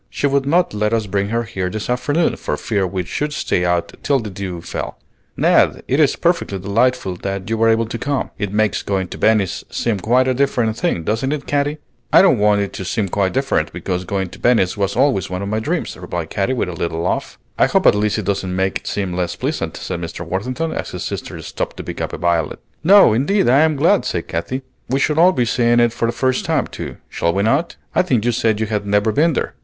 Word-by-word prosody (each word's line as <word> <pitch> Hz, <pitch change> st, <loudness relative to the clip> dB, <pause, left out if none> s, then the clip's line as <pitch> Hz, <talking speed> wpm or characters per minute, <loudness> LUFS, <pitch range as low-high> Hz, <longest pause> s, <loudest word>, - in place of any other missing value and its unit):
She -, -, -2 dB
would 140 Hz, -1 st, +1 dB
not 170 Hz, 0 st, +2 dB
let 105 Hz, +1 st, 0 dB
us 115 Hz, -2 st, +1 dB
bring 100 Hz, 0 st, -1 dB
her 115 Hz, +1 st, 0 dB
here 95 Hz, -4 st, -3 dB
this 110 Hz, +2 st, -4 dB
afternoon, 125 Hz, +7 st, +1 dB
for -, -, -3 dB
fear 100 Hz, -4 st, -1 dB
we 90 Hz, 0 st, -3 dB
should 150 Hz, -, -3 dB
stay 90 Hz, -, 0 dB
out 90 Hz, -1 st, 0 dB
till 140 Hz, -, +2 dB
the 110 Hz, -4 st, -6 dB
dew 95 Hz, -2 st, -5 dB
fell. -, -, -5 dB, 0.4 s
Ned, -, -, +3 dB
it -, -, +1 dB
is -, -, +4 dB
perfectly 100 Hz, -, 0 dB
delightful 100 Hz, 0 st, 0 dB
that 95 Hz, 0 st, -4 dB
you -, -, +2 dB
were 115 Hz, 0 st, +3 dB
able 115 Hz, 0 st, +3 dB
to 115 Hz, +1 st, -5 dB
come. 140 Hz, -1 st, -2 dB
It 105 Hz, -2 st, -2 dB
makes 110 Hz, 0 st, +1 dB
going 95 Hz, -3 st, -2 dB
to -, -, -8 dB
Venice 105 Hz, -5 st, +2 dB
seem 115 Hz, -4 st, -1 dB
quite 125 Hz, +6 st, +2 dB
a 130 Hz, -, +2 dB
different 120 Hz, -4 st, +1 dB
thing, 140 Hz, -, -1 dB
doesn't 115 Hz, -, -1 dB
it, 150 Hz, -2 st, -3 dB
Katy?" 145 Hz, +1 st, 0 dB, 0.3 s
"I -, -, +7 dB
don't 160 Hz, -, +4 dB
want 105 Hz, 0 st, +3 dB
it 100 Hz, -, -3 dB
to -, -, -5 dB
seem 100 Hz, +2 st, -1 dB
quite 95 Hz, 0 st, 0 dB
different, 130 Hz, -, 0 dB
because 90 Hz, +1 st, -3 dB
going 95 Hz, 0 st, -2 dB
to -, -, -13 dB
Venice 115 Hz, -7 st, +3 dB
was 100 Hz, -1 st, -1 dB
always 130 Hz, -, +2 dB
one 90 Hz, +1 st, -3 dB
of 100 Hz, -, -3 dB
my 110 Hz, +1 st, 0 dB
dreams," 160 Hz, +9 st, -2 dB
replied 85 Hz, -2 st, -5 dB
Katy, 100 Hz, +6 st, 0 dB
with 120 Hz, -, -1 dB
a -, -, -5 dB
little 85 Hz, -1 st, -3 dB
laugh. 90 Hz, -, -2 dB, 0.2 s
"I -, -, +5 dB
hope -, -, +1 dB
at -, -, +7 dB
least 105 Hz, +1 st, 0 dB
it 110 Hz, -, -3 dB
doesn't 95 Hz, -2 st, -1 dB
make 95 Hz, 0 st, 0 dB
it -, -, -14 dB
seem 95 Hz, -3 st, -2 dB
less 90 Hz, -1 st, -2 dB
pleasant," -, -, -3 dB
said 85 Hz, -, -4 dB
Mr. 85 Hz, +1 st, -6 dB
Worthington, 125 Hz, -, -2 dB
as -, -, -4 dB
his -, -, -5 dB
sister -, -, -5 dB
stopped -, -, -4 dB
to -, -, -6 dB
pick -, -, -6 dB
a -, -, -3 dB
violet. 85 Hz, -2 st, 0 dB, 0.3 s
"No, 195 Hz, -, +7 dB
indeed, 170 Hz, -, +2 dB
I 130 Hz, +3 st, +5 dB
am 155 Hz, 0 st, +3 dB
glad," 170 Hz, +8 st, +3 dB
said 85 Hz, -, -2 dB
Katy; 105 Hz, +12 st, -3 dB, 0.3 s
"we 135 Hz, +2 st, +1 dB
shall 150 Hz, +2 st, +1 dB
all 180 Hz, +2 st, +7 dB
be 125 Hz, -8 st, 0 dB
seeing 120 Hz, 0 st, +2 dB
it 120 Hz, -1 st, +3 dB
for 115 Hz, -, -1 dB
the -, -, +1 dB
first 130 Hz, +1 st, 0 dB
time, -, -, +1 dB
too, -, -, -7 dB
shall 85 Hz, -, 0 dB
we 100 Hz, -, +1 dB
not? 140 Hz, +10 st, +1 dB, 0.2 s
I -, -, +4 dB
think 125 Hz, -, 0 dB
you 120 Hz, -, +3 dB
said 110 Hz, -2 st, +1 dB
you 110 Hz, -, +1 dB
had 105 Hz, -1 st, -2 dB
never 105 Hz, +2 st, +2 dB
been 155 Hz, +8 st, +3 dB
there." -, -, -2 dB
110 Hz, 245 wpm, -19 LUFS, 95-130 Hz, 0.4 s, I